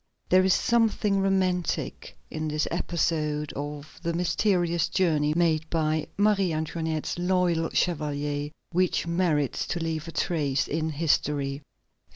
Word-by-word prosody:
There 185 Hz, +1 st, +5 dB
is 190 Hz, 0 st, +4 dB
something 220 Hz, -4 st, +2 dB
romantic 185 Hz, -3 st, -1 dB
in 155 Hz, 0 st, -3 dB
this 150 Hz, 0 st, -1 dB
episode 150 Hz, -3 st, -1 dB
of 145 Hz, +1 st, -7 dB
the 170 Hz, -1 st, -1 dB
mysterious 175 Hz, -1 st, +1 dB
journey 155 Hz, -5 st, +1 dB
made 160 Hz, -2 st, +1 dB
by 155 Hz, -1 st, 0 dB
Marie 200 Hz, -3 st, +3 dB
Antoinette's 160 Hz, +1 st, -2 dB
loyal 175 Hz, -2 st, +1 dB
chevalier, 145 Hz, -3 st, -1 dB, 0.2 s
which 180 Hz, 0 st, +1 dB
merits 170 Hz, -5 st, 0 dB
to 175 Hz, -, -2 dB
leave 165 Hz, -1 st, -3 dB
a -, -, -6 dB
trace 145 Hz, -6 st, 0 dB
in 160 Hz, +1 st, -1 dB
history. 145 Hz, -2 st, 0 dB
165 Hz, 125 wpm, -27 LUFS, 150-180 Hz, 0.2 s, There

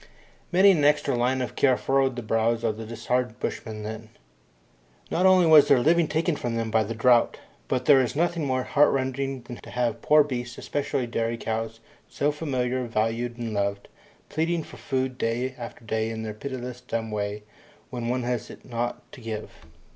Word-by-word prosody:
Many 190 Hz, +3 st, +7 dB
an 160 Hz, -6 st, +2 dB
extra 145 Hz, -2 st, +3 dB
line 125 Hz, +2 st, +1 dB
of 125 Hz, -, -6 dB
care 130 Hz, -3 st, +3 dB
furrowed 135 Hz, -1 st, +1 dB
the 120 Hz, -, -5 dB
brows 115 Hz, +1 st, +1 dB
of 110 Hz, -2 st, 0 dB
the 110 Hz, 0 st, -8 dB
disheartened 120 Hz, +1 st, -2 dB
bushmen 110 Hz, -2 st, -4 dB
then. 110 Hz, +1 st, -7 dB, 1.0 s
Not 180 Hz, +2 st, +3 dB
only 185 Hz, -2 st, +6 dB
was 155 Hz, -3 st, +8 dB
their 140 Hz, -, +6 dB
living 165 Hz, +5 st, +3 dB
taken 160 Hz, +2 st, 0 dB
from 120 Hz, -4 st, -3 dB
them 115 Hz, -1 st, -2 dB
by 110 Hz, 0 st, +3 dB
the 115 Hz, +3 st, -4 dB
drought, 120 Hz, +1 st, +4 dB, 0.3 s
but 125 Hz, -1 st, -1 dB
there 135 Hz, -1 st, +7 dB
is 125 Hz, -, -2 dB
nothing 170 Hz, +1 st, 0 dB
more 130 Hz, -1 st, 0 dB
heartrending 135 Hz, -2 st, +1 dB
than 120 Hz, 0 st, -8 dB
to -, -, -12 dB
have 120 Hz, -2 st, -1 dB
poor 150 Hz, 0 st, +5 dB
beasts, 120 Hz, -4 st, -5 dB
especially 140 Hz, -3 st, -2 dB
dairy 115 Hz, 0 st, -2 dB
cows, 115 Hz, 0 st, -4 dB, 0.3 s
so 145 Hz, +1 st, 0 dB
familiar, 130 Hz, -4 st, -2 dB
valued, 115 Hz, +2 st, -1 dB
and 115 Hz, -2 st, -4 dB
loved, 100 Hz, 0 st, -2 dB, 0.4 s
pleading 165 Hz, +1 st, -1 dB
for -, -, -12 dB
food 130 Hz, -2 st, -2 dB
day 120 Hz, +3 st, -1 dB
after 120 Hz, -1 st, -9 dB
day 110 Hz, 0 st, -1 dB
in 110 Hz, 0 st, -5 dB
their 110 Hz, -1 st, -4 dB
piteous 125 Hz, +1 st, -6 dB
dumb 115 Hz, -3 st, -4 dB
way 105 Hz, 0 st, -3 dB, 0.5 s
when 120 Hz, -2 st, -4 dB
one 125 Hz, +1 st, 0 dB
has 120 Hz, -2 st, -2 dB
it -, -, -12 dB
not 120 Hz, 0 st, -3 dB
to -, -, -12 dB
give. 110 Hz, -2 st, -5 dB
125 Hz, 185 wpm, -26 LUFS, 115-135 Hz, 1.0 s, was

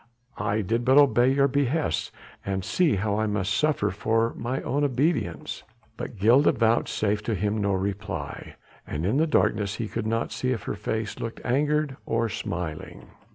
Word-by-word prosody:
I 105 Hz, +2 st, 0 dB
did 115 Hz, +5 st, -1 dB
but 130 Hz, +3 st, +4 dB
obey 130 Hz, -3 st, +5 dB
your 140 Hz, 0 st, +4 dB
behests 140 Hz, -, 0 dB, 0.3 s
and 95 Hz, -1 st, -2 dB
see 175 Hz, -, +2 dB
how 100 Hz, +2 st, 0 dB
I 110 Hz, -, +1 dB
must 100 Hz, -2 st, -1 dB
suffer 150 Hz, -10 st, +1 dB
for 115 Hz, +4 st, 0 dB
mine 125 Hz, +3 st, -3 dB
obedience." 140 Hz, -, 0 dB, 0.3 s
But -, -, -7 dB
Gilda 120 Hz, +9 st, +5 dB
vouchsafed 110 Hz, -3 st, +1 dB
him 105 Hz, 0 st, 0 dB
no 100 Hz, -1 st, +1 dB
reply, 95 Hz, -4 st, -4 dB, 0.3 s
and 75 Hz, +3 st, -3 dB
in 110 Hz, +8 st, +1 dB
the 160 Hz, +2 st, +3 dB
darkness 105 Hz, -8 st, +1 dB
he 115 Hz, -1 st, -3 dB
could 110 Hz, 0 st, -3 dB
not 115 Hz, +1 st, -1 dB
see 130 Hz, 0 st, -1 dB
if 115 Hz, -, -5 dB
her -, -, -3 dB
face 110 Hz, +1 st, -3 dB
looked 115 Hz, -, -5 dB
angered 145 Hz, +2 st, +1 dB
or 115 Hz, 0 st, 0 dB
smiling. 85 Hz, -6 st, -5 dB
115 Hz, 160 wpm, -26 LUFS, 100-130 Hz, 0.3 s, obey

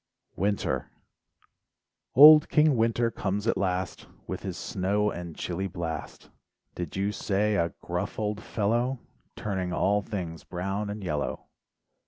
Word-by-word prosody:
WINTER 100 Hz, +2 st, -1 dB, 1.3 s
Old 150 Hz, +2 st, +10 dB
King 150 Hz, -2 st, +4 dB
Winter 115 Hz, 0 st, +2 dB
comes 100 Hz, 0 st, -2 dB
at 115 Hz, -, +2 dB
last 95 Hz, -1 st, -2 dB, 0.2 s
With -, -, -5 dB
his -, -, -5 dB
snow 100 Hz, +3 st, 0 dB
and 85 Hz, -2 st, -7 dB
chilly 95 Hz, +2 st, -3 dB
blast, 85 Hz, -3 st, -6 dB, 0.4 s
Did 85 Hz, -4 st, -5 dB
you 100 Hz, +2 st, 0 dB
say 105 Hz, +1 st, 0 dB
a 85 Hz, -2 st, 0 dB
gruff -, -, -3 dB
old 105 Hz, -1 st, -2 dB
fellow, 120 Hz, +5 st, 0 dB, 0.4 s
Turning 95 Hz, -3 st, -3 dB
all 100 Hz, +3 st, +2 dB
things 90 Hz, -7 st, -5 dB
brown 95 Hz, +3 st, -3 dB
and 105 Hz, 0 st, -5 dB
yellow. 75 Hz, -5 st, -3 dB
100 Hz, 130 wpm, -27 LUFS, 90-110 Hz, 1.3 s, Old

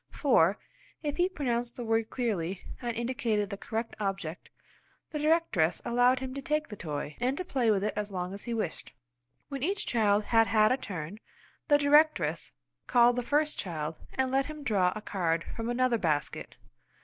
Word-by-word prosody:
For, 205 Hz, -, +3 dB, 0.5 s
if 295 Hz, -1 st, -2 dB
he 360 Hz, +1 st, +3 dB
pronounced 245 Hz, -8 st, -2 dB
the 245 Hz, -, -5 dB
word 225 Hz, 0 st, +1 dB
clearly 195 Hz, -7 st, -2 dB, 0.2 s
and 235 Hz, -2 st, -3 dB
indicated 230 Hz, -4 st, -1 dB
the -, -, -2 dB
correct 225 Hz, +3 st, -4 dB
object, 195 Hz, -5 st, -4 dB, 0.6 s
the 300 Hz, -, -3 dB
directress 300 Hz, -, +2 dB
allowed 245 Hz, +2 st, +4 dB
him 260 Hz, -1 st, -4 dB
to 275 Hz, -, -5 dB
take 300 Hz, +2 st, -1 dB
the 210 Hz, -, -6 dB
toy, 150 Hz, -4 st, -5 dB
and 255 Hz, +3 st, 0 dB
to 365 Hz, -, -3 dB
play 255 Hz, -9 st, +1 dB
with 200 Hz, -2 st, +2 dB
it 210 Hz, -, 0 dB
as 210 Hz, 0 st, -3 dB
long 180 Hz, 0 st, -3 dB
as 200 Hz, -, -7 dB
he 240 Hz, -, -3 dB
wished. 195 Hz, -8 st, -4 dB, 0.6 s
When 275 Hz, -2 st, -5 dB
each 390 Hz, +8 st, 0 dB
child 210 Hz, -3 st, +2 dB
had 225 Hz, +1 st, +3 dB
had 215 Hz, -1 st, +4 dB
a 255 Hz, -, +3 dB
turn, 185 Hz, -, -6 dB, 0.5 s
the 290 Hz, -, +6 dB
directress 295 Hz, +2 st, +3 dB, 0.4 s
called 240 Hz, 0 st, +5 dB
the 245 Hz, -, 0 dB
first 295 Hz, +4 st, +1 dB
child 160 Hz, -4 st, -3 dB, 0.2 s
and 260 Hz, -1 st, 0 dB
let 270 Hz, 0 st, +2 dB
him 305 Hz, -1 st, -8 dB
draw 195 Hz, -8 st, +2 dB
a 215 Hz, -, -5 dB
card 170 Hz, -5 st, -1 dB
from 230 Hz, 0 st, -3 dB
another 245 Hz, -1 st, +2 dB
basket. 150 Hz, -5 st, -2 dB
230 Hz, 185 wpm, -29 LUFS, 195-265 Hz, 0.6 s, the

